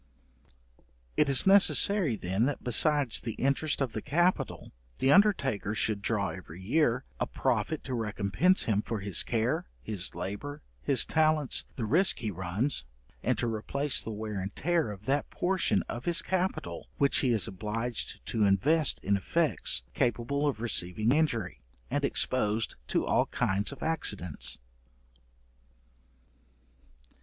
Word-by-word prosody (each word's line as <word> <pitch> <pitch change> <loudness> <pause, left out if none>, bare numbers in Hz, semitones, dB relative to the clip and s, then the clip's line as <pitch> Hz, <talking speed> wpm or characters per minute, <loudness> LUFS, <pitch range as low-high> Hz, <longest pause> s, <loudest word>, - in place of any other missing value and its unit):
It 150 - +3
is 135 -2 +2
necessary 195 - +4
then, 95 +4 0
that, 145 - -3
besides 140 +1 +2
the 115 - -4
interest 140 +3 0
of 130 -4 -1
the 110 - -3
capital, 175 - 0 0.3
the 135 - +2
undertaker 135 - +3
should 110 -2 0
draw 100 -2 0
every 90 -2 -9
year 125 +4 +1 0.2
a - - 0
profit 160 - -1
to 130 - -5
recompence 110 - +1
him 105 -2 +1
for 110 -1 -4
his 100 -3 +2
care, 125 +10 -1 0.2
his 100 -4 -2
labour, 105 +12 -6 0.2
his 135 - +2
talents, 155 -3 +2
the 115 - -3
risque 175 - +3
he 110 -3 -3
runs, 95 - -2 0.4
and - - 0
to - - 0
replace 135 +6 0
the - - -6
wear 105 -1 -4
and 95 +2 -5
tear 170 -3 0
of 105 0 -10
that 140 +2 0
portion 180 - 0
of 120 - -7
his 170 -1 +2
capital 185 0 -2
which 140 -1 +2
he 130 - +2
is 110 -6 +4
obliged 105 - -4
to 110 - 0
invest 140 - +2
in 100 +1 +2
effects 100 - +1
capable 125 +5 0
of 135 -6 -1
receiving 110 -1 +1
injury, 135 - 0 0.3
and - - 0
exposed 105 +1 +1
to - - 0
all - - +2
kinds 100 +5 0
of 140 - -9
accidents. 105 - -1
120 Hz, 145 wpm, -29 LUFS, 105-150 Hz, 0.4 s, necessary